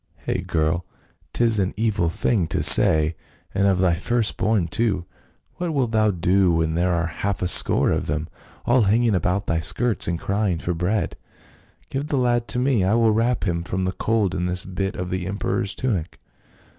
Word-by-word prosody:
" - - -28
Hcgh, - - -2
girl! 80 +2 0 0.5
'tis 115 -3 +2
an 95 -1 -1
evil 105 -6 0
thing 90 +1 0
to - - -2
say, 80 +1 +5 0.4
and 100 +1 +2
of 95 -2 +2
thy 90 -2 +2
first 110 +6 0
born 95 -3 0
too; 95 -1 -1 0.5
what 175 -3 -3
wilt 125 -5 0
thou 110 -1 +2
do 90 0 +2
when 80 -1 0
there 90 +2 +1
are 85 0 0
half 95 +3 -3
a - - +1
score - - +3
of - - -1
them, 75 +1 -2 0.4
all 120 +2 +3
hanging 110 +2 +2
about 90 +2 0
thy 80 - 0
skirts 115 +6 0
and 85 -1 -2
cry 100 +1 -1
ing 85 - -1
for 90 +2 -3
bread? 90 +6 -2 0.7
Give 140 +2 -3
the 145 - -1
lad 120 -2 +1
to - - +1
me; 125 -5 +1
I 95 +4 +2
will 115 -1 +3
wrap 115 +2 0
him 85 -3 -1
from 90 +2 -3
the 95 - -1
cold 105 0 0
in 90 -1 -2
this 90 +1 0
bit 95 +1 -3
of 90 0 -5
the 95 -1 -3
emperor's 100 0 -1
tunic. 100 -11 -3
95 Hz, 200 wpm, -22 LUFS, 90-115 Hz, 0.7 s, say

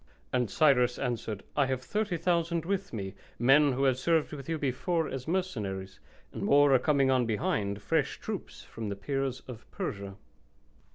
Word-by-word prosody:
And 125 -4 +1
Cyrus 125 -1 +3
answered, 115 -5 -3
"I 145 -2 +3
have 130 -1 -2
30,000 170 -3 0
with 195 +1 -2
me, 95 -4 -5 0.2
men 135 +3 +5
who 135 +2 -1
have 130 -2 +3
served 160 +1 +1
with 140 0 -7
you 165 - 0
before 155 +4 0
as 135 0 -6
mercenaries; 105 - -3 0.3
and - - -6
more 145 0 +5
are 130 - +6
coming 135 -1 +3
on 125 -2 +2
behind, 105 - -1
fresh - - 0
troops, - - -6
from 110 -2 -6
the 100 - -3
Peers 135 +5 -2
of 120 -3 -10
Persia." 100 -1 -5
135 Hz, 165 wpm, -30 LUFS, 115-160 Hz, 0.3 s, are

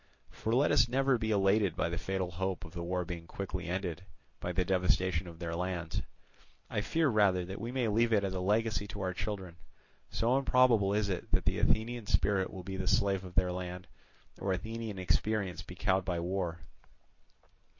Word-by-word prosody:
For 110 - -3
let 140 +4 +4
us 115 +2 +5
never 135 0 +2
be 110 -1 -1
elated 100 -3 +3
by 85 - 0
the 85 0 -3
fatal 95 -1 -2
hope 95 +1 -2
of 85 - -12
the 85 - -5
war 90 +1 -1
being 85 -1 -6
quickly 95 -1 -5
ended 90 -2 -2 0.4
by 90 - -3
the 90 0 +1
devastation 90 -1 +1
of 85 -1 -10
their 85 -1 -4
lands. 85 -2 -2 0.7
I 105 - 0
fear 160 +8 +1
rather 100 -7 +3
that 95 +2 -7
we 115 +2 -3
may 125 -2 0
leave 115 +2 +2
it 105 -2 +4
as 95 -1 -1
a 95 - -2
legacy 105 +2 +1
to 100 +1 -6
our 95 -1 -1
children; 95 -3 -4 0.5
so 120 +4 +2
improbable 125 -7 +4
is 105 -1 +1
it 90 - -3
that - - +3
the - - +1
Athenian 115 0 +1
spirit 95 -2 +2
will 95 - -7
be 95 +1 -5
the 95 -1 -3
slave 100 -1 +2
of 90 -1 -10
their 90 +2 +3
land, 90 0 -5 0.5
or 95 - -1
Athenian 110 +1 -4
experience 95 +1 0
be 90 - -10
cowed 95 0 +1
by 90 -2 -1
war. 85 -1 -2
95 Hz, 195 wpm, -32 LUFS, 90-110 Hz, 0.7 s, us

